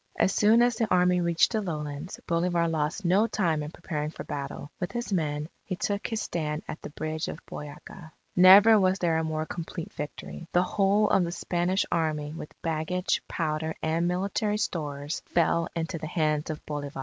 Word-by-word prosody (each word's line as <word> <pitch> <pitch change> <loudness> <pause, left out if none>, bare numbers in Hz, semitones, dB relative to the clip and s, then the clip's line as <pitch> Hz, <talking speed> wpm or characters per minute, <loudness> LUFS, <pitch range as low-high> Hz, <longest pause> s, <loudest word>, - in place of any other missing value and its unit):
As 190 - +3
soon 220 +3 +5
as 240 -1 +2
the 225 -3 0
Army 180 0 +4
reached 170 -1 +3
the 220 -2 0
lowlands, 150 -2 -5
Bolivar 170 0 +1
lost 160 +4 -1
no 195 +6 +4
time 170 -9 0
in 150 - -4
preparing 150 -2 -4
for - - -8
battle. 145 +1 -6
With 180 - -3
his 240 -3 -3
men, 150 -4 -1 0.2
he 185 - -4
took 200 +3 -2
his 225 -2 -2
stand 150 -2 -3
at 155 - -6
the - - -7
Bridge 155 +1 -3
of - - -5
Boyaca. 150 +3 -9 0.2
Never 200 +4 +9
was 185 0 +3
there 165 -3 +1
a - - -1
more 155 0 -2
complete 165 0 -6
victory. 150 +3 -7
The 180 - +4
whole 200 +2 +2
of 190 - +4
the 170 - -2
Spanish 180 +2 0
Army 155 -2 -1
with 160 -2 -9
baggage, 165 +3 0
powder, 155 +1 -2
and 165 +2 +1
military 200 +4 0
stores, 145 -6 -3
fell 170 0 +2
into 165 0 -3
the 155 - -5
hands 155 -2 0
of 155 -1 -5
Bolivar. 145 -2 -5
170 Hz, 185 wpm, -27 LUFS, 155-185 Hz, 0.2 s, Never